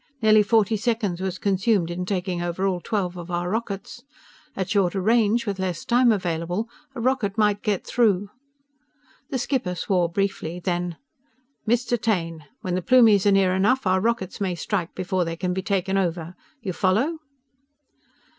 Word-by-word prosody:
Nearly 215 Hz, -2 st, +5 dB
forty 220 Hz, 0 st, +2 dB
seconds 210 Hz, -5 st, -1 dB
was 190 Hz, -1 st, -2 dB
consumed 195 Hz, -2 st, +1 dB
in 180 Hz, +1 st, -4 dB
taking 185 Hz, -2 st, -2 dB
over 175 Hz, +2 st, -2 dB
all 185 Hz, -2 st, 0 dB
twelve 185 Hz, -5 st, -2 dB
of 175 Hz, 0 st, -8 dB
our 175 Hz, 0 st, -2 dB
rockets. 220 Hz, +1 st, -4 dB, 0.5 s
At 190 Hz, -2 st, -2 dB
shorter 195 Hz, -2 st, +2 dB
range, 225 Hz, +3 st, +2 dB
with 200 Hz, -3 st, -3 dB
less 190 Hz, +5 st, -3 dB
time 245 Hz, -1 st, +4 dB
available, 175 Hz, +1 st, -1 dB, 0.3 s
a -, -, -5 dB
rocket 230 Hz, -5 st, 0 dB
might 210 Hz, -1 st, +2 dB
get 205 Hz, -4 st, -1 dB
through!" 205 Hz, -4 st, +1 dB, 1.0 s
The 265 Hz, -, -1 dB
skipper 250 Hz, -7 st, -1 dB
swore 175 Hz, 0 st, +1 dB
briefly. 180 Hz, -2 st, -2 dB
Then: 175 Hz, -1 st, -2 dB, 0.7 s
"_Mr. 240 Hz, 0 st, +1 dB
Taine! 165 Hz, -8 st, -1 dB, 0.2 s
When 180 Hz, -, -3 dB
the 185 Hz, -, 0 dB
Plumies 220 Hz, -3 st, +5 dB
are -, -, +6 dB
near 195 Hz, -2 st, +3 dB
enough, 210 Hz, +7 st, +2 dB
our 185 Hz, 0 st, +2 dB
rockets 225 Hz, -4 st, -1 dB
may 185 Hz, -3 st, 0 dB
strike 175 Hz, +1 st, -3 dB
before 185 Hz, 0 st, -1 dB
they 165 Hz, -1 st, -3 dB
can 180 Hz, +1 st, -2 dB
be 190 Hz, -, -2 dB
taken 195 Hz, -1 st, 0 dB
over! 170 Hz, -1 st, -2 dB, 0.3 s
You 190 Hz, -4 st, -3 dB
follow? 225 Hz, -, +1 dB
195 Hz, 165 wpm, -24 LUFS, 180-220 Hz, 1.0 s, are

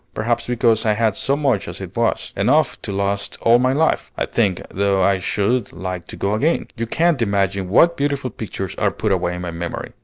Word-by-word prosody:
Perhaps 120 Hz, +2 st, -1 dB
because 120 Hz, -2 st, +2 dB
I 110 Hz, -, +2 dB
had 110 Hz, -2 st, +1 dB
so 140 Hz, +1 st, 0 dB
much 135 Hz, -9 st, 0 dB
as -, -, -7 dB
it -, -, -8 dB
was, -, -, -1 dB
enough -, -, +2 dB
to -, -, -5 dB
last 100 Hz, 0 st, -2 dB
all 115 Hz, +1 st, +5 dB
my 130 Hz, +1 st, +2 dB
life, 155 Hz, +4 st, +1 dB
I -, -, 0 dB
think, 100 Hz, -6 st, 0 dB
though 100 Hz, 0 st, +1 dB
I 95 Hz, 0 st, +3 dB
should 105 Hz, +6 st, 0 dB
like 90 Hz, -1 st, -5 dB
to -, -, -8 dB
go 100 Hz, -, -1 dB
again. 150 Hz, +10 st, 0 dB
You 115 Hz, 0 st, -3 dB
can't 165 Hz, +1 st, +1 dB
imagine 100 Hz, -3 st, 0 dB
what 170 Hz, -, +4 dB
beautiful 140 Hz, -3 st, -1 dB
pictures 95 Hz, -4 st, -5 dB
are 105 Hz, -, +3 dB
put 105 Hz, +1 st, -2 dB
away 90 Hz, -2 st, 0 dB
in 90 Hz, -, -6 dB
my 90 Hz, -, -4 dB
memory." 85 Hz, +1 st, -5 dB
105 Hz, 215 wpm, -20 LUFS, 95-125 Hz, -, all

